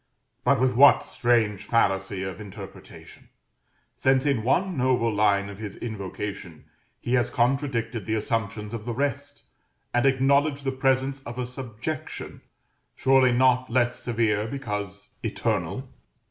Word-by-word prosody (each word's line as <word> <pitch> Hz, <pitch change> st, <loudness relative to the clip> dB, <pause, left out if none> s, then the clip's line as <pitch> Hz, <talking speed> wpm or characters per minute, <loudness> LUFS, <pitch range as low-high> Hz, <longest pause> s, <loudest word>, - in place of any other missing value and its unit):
But -, -, +3 dB
with 130 Hz, 0 st, +2 dB
what 140 Hz, +3 st, +7 dB
strange 110 Hz, -5 st, +1 dB
fallacy 95 Hz, -4 st, +1 dB
of 95 Hz, +2 st, -6 dB
interpretation! 100 Hz, -1 st, -12 dB, 0.7 s
since 130 Hz, +1 st, +2 dB
in 140 Hz, -6 st, +2 dB
one 175 Hz, -, +1 dB
noble 125 Hz, -4 st, +1 dB
line 100 Hz, -1 st, +2 dB
of 100 Hz, 0 st, -9 dB
his 105 Hz, -3 st, -6 dB
invocation 100 Hz, -5 st, -6 dB, 0.3 s
he 120 Hz, -, -3 dB
has 125 Hz, -2 st, +2 dB
contradicted 120 Hz, -4 st, -1 dB
the 110 Hz, -, 0 dB
assumptions 105 Hz, 0 st, -2 dB
of 110 Hz, -2 st, -5 dB
the 120 Hz, -1 st, -3 dB
rest, 140 Hz, +1 st, -3 dB, 0.5 s
and 120 Hz, +3 st, +3 dB
acknowledged 140 Hz, +2 st, +2 dB
the 135 Hz, -, 0 dB
presence 135 Hz, +1 st, +1 dB
of 120 Hz, -2 st, -9 dB
a 125 Hz, -, -2 dB
subjection, 125 Hz, +5 st, -6 dB, 0.5 s
surely 130 Hz, -1 st, +4 dB
not 130 Hz, +1 st, +3 dB
less 120 Hz, +1 st, +1 dB
severe 110 Hz, -3 st, 0 dB
because 105 Hz, -6 st, -5 dB
eternal? -, -, -2 dB
120 Hz, 130 wpm, -25 LUFS, 105-135 Hz, 0.7 s, what